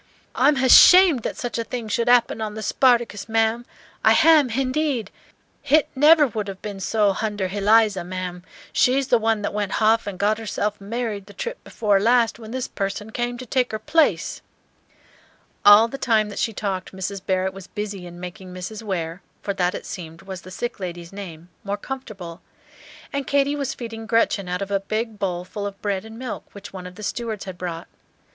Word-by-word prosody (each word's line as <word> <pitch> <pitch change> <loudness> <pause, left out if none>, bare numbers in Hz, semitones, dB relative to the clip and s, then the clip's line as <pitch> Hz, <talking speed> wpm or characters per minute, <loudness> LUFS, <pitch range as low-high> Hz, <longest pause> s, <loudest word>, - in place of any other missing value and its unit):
I'm 285 +4 +4
h'ashamed 285 +4 +7
that - - -4
such 240 -1 -3
a - - 0
thing 235 -1 -5
should 235 +3 0
'appen 240 -2 +3
on 215 -1 -4
the 220 - -5
'Spartacus,' 235 -6 +2
ma'am, 225 +2 +1 0.4
I - - +6
h'am, 315 -4 +5
h'indeed. 260 -2 -1 0.6
H'it 300 +2 +5
never 300 +3 +6
would 215 -5 -4
'ave 195 - -6
ben 205 -2 -7
so 205 +1 +2
h'under 205 -2 -2
h'Eliza, 205 0 +3
ma'am, 180 0 -5 0.3
she's 265 +1 +2
the 240 - +4
one 220 -1 0
that - - -2
went 205 -2 -2
h'off 220 0 +2
and 195 -2 -5
got 210 +3 +1
herself 210 -2 -3
married 210 -2 -4
the 205 - -14
trip 485 0 -5
before 205 -4 +1
last, 235 +2 +3
when 220 -2 -10
this 255 +1 -3
person 200 +2 -4
came 240 +1 -2
to 255 - -8
take 250 +1 0
her 215 - -2
place." 300 +8 +1 1.2
All 205 +2 +8
the 275 +4 -7
time 220 -5 +2
that 205 - -6
she 225 - 0
talked 195 -3 -4
Mrs. 190 0 -5
Barrett 190 0 0
was 195 -1 -10
busy 200 -3 -5
in 175 0 -11
making 180 +1 -8
Mrs. 185 +4 -7
Ware 180 -4 -4 0.2
for 200 - -1
that, 180 -2 0
it - - -7
seemed, 170 -3 -8
was 190 -2 -7
the 185 - -12
sick 240 +5 -5
lady's 175 -1 -6
name 175 -4 -9
more 200 0 -2
comfortable; 205 -9 -8 0.7
and 280 -1 -2
Katy 280 0 +2
was 280 -2 -3
feeding 225 -2 -7
Gretchen 220 -4 +1
out 180 +2 -2
of 200 - -8
a 200 - +2
big 215 +2 -3
bowl 180 -2 -2
full 205 +2 -5
of 200 -1 -9
bread 200 -1 -2
and 220 0 -10
milk 250 -2 -6
which 200 - -10
one 185 -1 -7
of 180 - -12
the 215 - -10
stewards 220 -1 -4
had 190 -2 -7
brought. 170 -2 -5
215 Hz, 195 wpm, -23 LUFS, 195-240 Hz, 1.2 s, All